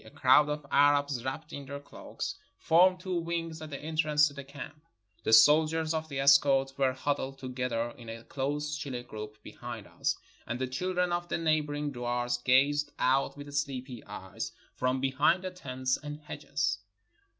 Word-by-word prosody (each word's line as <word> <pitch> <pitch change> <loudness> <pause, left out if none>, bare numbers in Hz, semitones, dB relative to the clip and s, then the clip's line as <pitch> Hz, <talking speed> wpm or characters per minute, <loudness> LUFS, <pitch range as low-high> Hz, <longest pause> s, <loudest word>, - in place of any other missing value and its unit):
A 110 - -13
crowd 130 +6 +5
of 150 -1 -3
Arabs 145 -3 +3
wrapped 150 +4 -5
in 140 -1 -7
their 140 +1 -5
cloaks 145 - -6 0.2
formed 185 +3 +4
two 180 -2 -1
wings 165 -1 -3
at 155 - -7
the 140 - -5
entrance 155 -1 +2
to 145 - -8
the 140 0 -7
camp. 140 +2 -10 0.4
The - - 0
soldiers 155 +7 +6
of 160 0 -3
the 135 -2 -3
escort 135 -1 +5
were 135 -2 +2
huddled 135 0 -2
together 125 -3 -2
in 115 -2 -11
a 115 0 -7
close 145 +3 -2
chilly 135 -5 -5
group 110 -2 -8
behind - - -8
us, - - -1 0.3
and 120 - -2
the 130 - -1
children 180 +7 -1
of 175 0 -1
the - - 0
neighboring 150 -2 0
duars 120 -1 -2
gazed 145 +3 +3
out 135 +2 +2
with 145 0 -9
sleepy 130 -4 -3
eyes - - -6 0.2
from 130 +1 0
be 135 0 +1
hind 160 +7 +3
the 185 - -3
tents 130 -7 -2
and 150 0 -6
hedges. 140 -7 -2
140 Hz, 175 wpm, -30 LUFS, 130-155 Hz, 0.4 s, soldiers